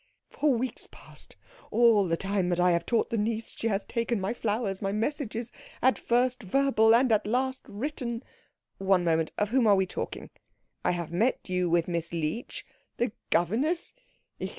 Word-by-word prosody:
"For 295 Hz, -1 st, +2 dB
weeks 250 Hz, +1 st, -1 dB
past, -, -, -12 dB, 0.3 s
all 225 Hz, -4 st, +4 dB
the 165 Hz, 0 st, 0 dB
time 195 Hz, -1 st, 0 dB
that 175 Hz, 0 st, 0 dB
I 180 Hz, 0 st, +4 dB
have 170 Hz, 0 st, 0 dB
taught 235 Hz, -, +1 dB
the 230 Hz, -, 0 dB
niece, 220 Hz, +1 st, -2 dB
she 230 Hz, -, -2 dB
has 200 Hz, -2 st, -1 dB
taken 230 Hz, -1 st, -1 dB
my 190 Hz, +4 st, -1 dB
flowers, 210 Hz, -4 st, -2 dB
my 195 Hz, -1 st, -1 dB
messages, 230 Hz, +1 st, -2 dB, 0.3 s
at 260 Hz, +1 st, +3 dB
first 250 Hz, +1 st, +1 dB
verbal 225 Hz, 0 st, +4 dB
and 250 Hz, 0 st, +3 dB
at 215 Hz, -1 st, +2 dB
last 260 Hz, +3 st, 0 dB
written 240 Hz, 0 st, -4 dB, 0.3 s
" -, -, -57 dB, 0.2 s
"One 190 Hz, -2 st, +3 dB
moment. 160 Hz, -2 st, +1 dB
Of 210 Hz, -1 st, +1 dB
whom 245 Hz, -1 st, +3 dB
are 205 Hz, -, +6 dB
we 190 Hz, -1 st, +2 dB
talking? 185 Hz, -, -5 dB, 0.5 s
I -, -, +2 dB
have 170 Hz, -2 st, -2 dB
met 220 Hz, +9 st, 0 dB
you 180 Hz, -1 st, +1 dB
with 170 Hz, 0 st, +2 dB
Miss 170 Hz, -1 st, -3 dB
Leech 165 Hz, +8 st, -3 dB, 0.2 s
" -, -, -45 dB
"The 240 Hz, -2 st, 0 dB, 0.2 s
governess? 250 Hz, -, +1 dB
220 Hz, 180 wpm, -28 LUFS, 185-240 Hz, 0.5 s, are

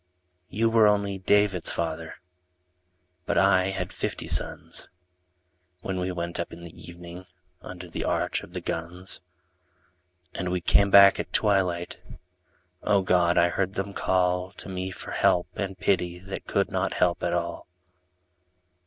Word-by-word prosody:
You 115 Hz, +3 st, +1 dB
were, 115 Hz, -1 st, +5 dB
only 100 Hz, -2 st, +1 dB
David's 100 Hz, -2 st, +2 dB
father, 80 Hz, -1 st, -3 dB, 1.1 s
But -, -, 0 dB
I 95 Hz, -1 st, +4 dB
had 95 Hz, -1 st, -3 dB
fifty -, -, -4 dB
sons -, -, -2 dB, 0.9 s
When 95 Hz, 0 st, -3 dB
we 90 Hz, +1 st, -1 dB
went 85 Hz, -1 st, -4 dB
up 85 Hz, -, -3 dB
in 85 Hz, -, -10 dB
the 85 Hz, -1 st, -10 dB
evening 85 Hz, +1 st, -10 dB, 0.3 s
Under 90 Hz, -1 st, -9 dB
the 85 Hz, -, -5 dB
arch -, -, 0 dB
of -, -, -13 dB
the -, -, -4 dB
guns, 90 Hz, +3 st, -5 dB, 1.1 s
And 90 Hz, -, -3 dB
we 90 Hz, 0 st, 0 dB
came 100 Hz, +3 st, +4 dB
back 100 Hz, 0 st, +8 dB
at -, -, -4 dB
twilight 95 Hz, -5 st, +1 dB, 0.4 s
— -, -, -40 dB, 0.2 s
O 100 Hz, -2 st, +2 dB
God! 90 Hz, -2 st, +3 dB
I 85 Hz, 0 st, +5 dB
heard 95 Hz, +2 st, -2 dB
them 100 Hz, +1 st, -3 dB
call 90 Hz, 0 st, 0 dB
To -, -, -10 dB
me 95 Hz, 0 st, -3 dB
for 95 Hz, -, -9 dB
help 90 Hz, 0 st, +2 dB
and 95 Hz, -1 st, -4 dB
pity 90 Hz, -2 st, 0 dB
That 95 Hz, +2 st, -8 dB
could 100 Hz, 0 st, 0 dB
not 95 Hz, 0 st, -1 dB
help 90 Hz, -1 st, +1 dB
at 85 Hz, 0 st, -1 dB
all. 85 Hz, 0 st, -3 dB
90 Hz, 155 wpm, -26 LUFS, 85-95 Hz, 1.1 s, back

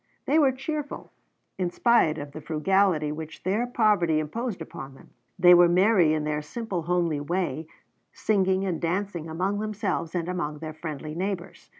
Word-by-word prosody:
They 305 Hz, +3 st, +3 dB
were 280 Hz, -3 st, +5 dB
cheerful, 290 Hz, +3 st, -5 dB, 0.5 s
in 180 Hz, -2 st, 0 dB
spite 175 Hz, -5 st, +3 dB
of 145 Hz, -1 st, -7 dB
the 155 Hz, -, -8 dB
frugality 160 Hz, 0 st, +1 dB
which 155 Hz, +1 st, -8 dB
their 210 Hz, +7 st, 0 dB
poverty 210 Hz, -9 st, +2 dB
imposed 210 Hz, +8 st, -3 dB
upon 135 Hz, 0 st, -8 dB
them; -, -, -18 dB, 0.3 s
and 180 Hz, 0 st, +8 dB
were 175 Hz, -1 st, +7 dB
merry 180 Hz, -2 st, +4 dB
in 155 Hz, -, -2 dB
their 150 Hz, 0 st, -1 dB
simple 195 Hz, +3 st, -4 dB
homely 170 Hz, -2 st, 0 dB
way, 160 Hz, -1 st, -2 dB, 0.4 s
singing 190 Hz, -2 st, +1 dB
and 180 Hz, -4 st, -2 dB
dancing 175 Hz, -1 st, -2 dB
among 190 Hz, +5 st, -1 dB
themselves 210 Hz, -5 st, -2 dB
and 170 Hz, -1 st, -1 dB
among 175 Hz, -5 st, -3 dB
their 155 Hz, +1 st, -7 dB
friendly 155 Hz, -1 st, -6 dB
neighbors. 185 Hz, +1 st, -5 dB
175 Hz, 165 wpm, -26 LUFS, 155-200 Hz, 0.5 s, and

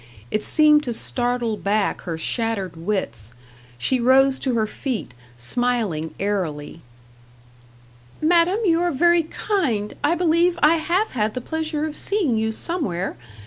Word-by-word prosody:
It 215 Hz, -, 0 dB
seemed 300 Hz, -1 st, +5 dB
to 240 Hz, -, -2 dB
startle 240 Hz, -1 st, -1 dB
back 205 Hz, 0 st, 0 dB
her 165 Hz, -, -2 dB
shattered 200 Hz, -1 st, -2 dB
wits. 160 Hz, -, -3 dB, 0.4 s
She 255 Hz, -, 0 dB
rose 265 Hz, +2 st, +4 dB
to 255 Hz, -3 st, -1 dB
her 220 Hz, -1 st, +2 dB
feet, 225 Hz, -, -4 dB, 0.2 s
smiling 180 Hz, -, -1 dB
airily. 165 Hz, -6 st, -3 dB, 1.4 s
"Madam, 340 Hz, +4 st, +3 dB
you 335 Hz, -2 st, +3 dB
are 350 Hz, -, +1 dB
very 345 Hz, +4 st, +4 dB
kind. 300 Hz, -, -2 dB
I 305 Hz, +4 st, +3 dB
believe 345 Hz, 0 st, +2 dB
I 315 Hz, +3 st, +6 dB
have 355 Hz, +7 st, 0 dB
had 215 Hz, -3 st, -1 dB
the -, -, -1 dB
pleasure 315 Hz, +1 st, -2 dB
of 305 Hz, -1 st, -5 dB
seeing 375 Hz, -, 0 dB
you 220 Hz, 0 st, 0 dB
somewhere. 220 Hz, -, -2 dB
245 Hz, 140 wpm, -22 LUFS, 205-320 Hz, 1.4 s, I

